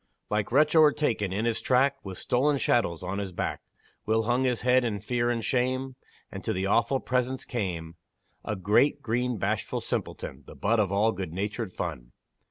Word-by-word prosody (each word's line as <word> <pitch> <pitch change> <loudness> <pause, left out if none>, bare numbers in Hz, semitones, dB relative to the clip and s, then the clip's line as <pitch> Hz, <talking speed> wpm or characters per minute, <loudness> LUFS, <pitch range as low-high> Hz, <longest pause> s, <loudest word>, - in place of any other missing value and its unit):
Like 105 0 0
wretch 150 +4 +4
o'ertaken 145 - +3
in 105 +4 -1
his 115 -1 0
track, 135 +2 +2
With 95 -2 -7
stolen 140 +4 +1
chattels 90 -11 +1
on 95 +2 -3
his 100 -2 -4
back, 85 - -3 0.5
Will 110 +1 +2
hung 120 +3 +1
his 125 -2 0
head 125 +1 +4
in 110 -4 -1
fear 120 +3 0
and 115 -2 -1
shame, 130 +1 0 0.4
And - - -7
to - - -1
the 95 +1 -1
awful 115 +6 +2
presence 130 +1 -1
came 85 -8 -4 0.5
A 110 - -2
great, 105 +10 +2
green, 120 +1 0
bashful - - -1
simpleton, - - -4
The - - -11
butt 115 0 +1
of 100 -3 +1
all 105 +3 +3
good 95 -5 -5
natured 105 +2 -3
fun. - - -5
115 Hz, 180 wpm, -27 LUFS, 100-130 Hz, 0.5 s, wretch